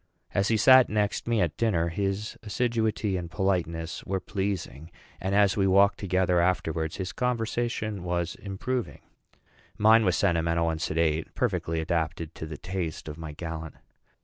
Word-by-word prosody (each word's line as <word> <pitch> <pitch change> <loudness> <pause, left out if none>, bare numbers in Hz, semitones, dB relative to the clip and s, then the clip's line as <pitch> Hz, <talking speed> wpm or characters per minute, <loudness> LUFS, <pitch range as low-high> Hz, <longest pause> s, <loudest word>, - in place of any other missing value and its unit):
As 100 0 +2
he 115 - +2
sat 130 +3 +7
next 105 +1 -1
me 115 -2 +2
at 85 -4 0
dinner, 85 -8 +1
his 100 +4 -2
assiduity 110 -3 0
and 85 -2 -5
politeness 85 -4 -1
were 95 -1 -2
pleasing; 90 -6 -4 0.3
and 95 +1 -1
as 100 -1 +4
we 95 -2 +2
walked 100 +2 +4
together 95 -2 +2
afterwards, 80 -3 0
his 95 -1 -4
conversation 115 -4 -2
was 85 -1 -1
improving. 110 +5 -4 0.8
Mine 110 +2 +6
was 90 -6 +2
sentimental 85 0 +1
and 80 0 -4
sedate 80 -2 0
perfectly 80 0 -1
adapted 80 0 -2
to 80 - -7
the 75 -1 -7
taste 90 -4 -4
of 75 +1 -7
my 80 -2 -6
gallant. 80 -1 -6
95 Hz, 150 wpm, -27 LUFS, 80-105 Hz, 0.8 s, sat